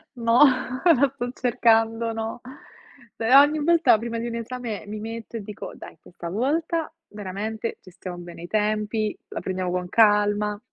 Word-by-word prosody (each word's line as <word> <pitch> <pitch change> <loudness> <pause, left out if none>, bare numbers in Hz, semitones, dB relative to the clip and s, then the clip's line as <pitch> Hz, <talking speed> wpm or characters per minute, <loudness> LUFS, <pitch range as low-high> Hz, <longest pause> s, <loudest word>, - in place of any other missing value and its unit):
No, 235 0 +2 0.5
la 280 -5 +5
sto 245 -2 -4
cercando, 225 -1 +2
no. 225 +1 -5 0.7
Però, 255 +5 +6
ogni 300 +1 +2
volta, 335 -8 +5
prima 230 +1 -4
di 235 - -3
un 230 - -4
esame, 230 -3 -5
mi 210 +1 -6
metto 225 +1 -6
e - - -5
dico, 205 0 -8
dai, - - -12
questa 170 -1 -9
volta 310 - -1 0.2
veramente 210 +3 -5
gestiamo 180 -1 -9
bene 175 -1 -10
i - - -7
tempi, 215 +1 -1
la - - -5
prendiamo 185 -1 -3
con 180 0 -2
calma. 210 -1 +3
225 Hz, 155 wpm, -24 LUFS, 205-240 Hz, 0.7 s, Però